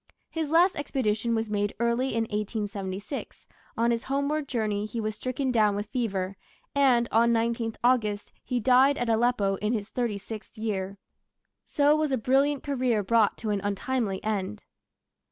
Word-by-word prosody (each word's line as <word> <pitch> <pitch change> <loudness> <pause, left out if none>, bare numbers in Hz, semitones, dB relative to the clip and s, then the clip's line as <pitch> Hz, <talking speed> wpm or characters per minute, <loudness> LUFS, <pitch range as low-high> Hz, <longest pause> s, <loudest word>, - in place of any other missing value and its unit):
His 320 -3 -2
last 350 +4 +4
expedition 235 -5 -1
was 225 -1 -2
made 205 0 -1
early 235 +2 +1
in 230 - +2
1876; 205 +1 -4 0.3
on 235 +1 +2
his 230 -1 -1
homeward 280 +2 -1
journey 215 -4 -1
he 230 +2 -5
was 215 -1 -2
stricken 255 +2 -2
down 215 -4 +3
with 205 +1 -2
fever, 195 -7 -2 0.4
and 255 -4 +4
on 230 +1 +4
19th 230 0 0
August 215 -5 +1
he 250 - -1
died 260 +4 +5
at 245 -1 -1
Aleppo 225 -4 +2
in 210 +4 -1
his 210 -2 -3
thirty 235 -4 -1
sixth 215 +2 -9
year. 200 -3 -3 0.7
So 290 +1 +3
was 310 -2 0
a 265 - +2
brilliant 270 +4 +2
career 250 -6 0
brought 220 +1 +3
to 220 -2 -3
an 200 -1 -1
untimely 205 0 -1
end. 210 -1 -2
230 Hz, 160 wpm, -27 LUFS, 210-255 Hz, 0.7 s, died